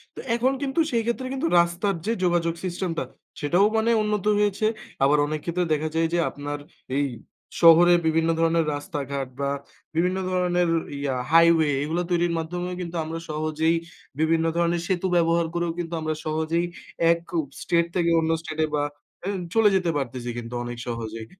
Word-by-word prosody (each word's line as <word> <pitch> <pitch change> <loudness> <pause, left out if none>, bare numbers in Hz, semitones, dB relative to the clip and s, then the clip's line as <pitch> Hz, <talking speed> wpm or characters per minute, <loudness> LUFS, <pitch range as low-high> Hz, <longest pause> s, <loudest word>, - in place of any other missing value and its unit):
তো - - -8 0.2
এখন 255 +3 +2
কিন্তু 275 +3 -1
সেই 230 -1 +2
ক্ষেত্রে 245 +2 -2
কিন্তু 270 +5 -1
রাস্তার 175 +4 +1
যে 225 - +1
যোগাযোগ 170 -2 +2
system 185 0 -2
টা - - 0 0.4
সেটাও 175 +7 +3
মানে 225 +1 +2
উন্নত 210 -2 -1
হয়েছে। 205 +1 +1 0.4
আবার 145 +2 +5
অনেক 155 +1 -3
ক্ষেত্রে 175 +1 0
দেখা 155 +1 -1
যায় 165 0 +2
যে, - - +2
আপনার 145 0 -5 0.4
এই 145 - +2 0.6
শহরে 170 +1 +8
বিভিন্ন 160 +1 +2
ধরনের 165 -1 +2
রাস্তাঘাট 140 -2 -4
বা 140 - 0 0.5
বিভিন্ন 180 +3 +1
ধরনের 180 -1 +1 0.3
ইয়া 140 -2 -1 0.2
highway 165 -2 +5
এগুলা 165 +4 -1
তৈরির 175 -1 +2
মাধ্যমেও 175 +2 -4
কিন্তু 170 0 -6
আমরা 160 +1 -5
সহজেই 155 +1 0 0.4
বিভিন্ন 160 +1 +2
ধরনের 170 0 +1
সেতু 185 0 0
ব্যবহার 170 0 +3
করেও 170 -1 -1
কিন্তু 170 0 -4
আমরা 155 0 -1
সহজেই 160 +2 0 0.5
এক 170 - +2 0.2
ও - - +3 0.2
state 170 0 +1
থেকে 170 -1 +2
অন্য 160 0 +1
state 155 -1 -3
এ - - -5
বা 145 - +1 0.4
এও 200 - -1 0.2
চলে 225 -2 +6
যেতে 185 -2 +1
পারতেছি 125 -3 -4
কিন্তু 120 0 -6
অনেক 120 0 -6
সহজেই। 115 -1 -5
170 Hz, 170 wpm, -25 LUFS, 155-180 Hz, 0.6 s, শহরে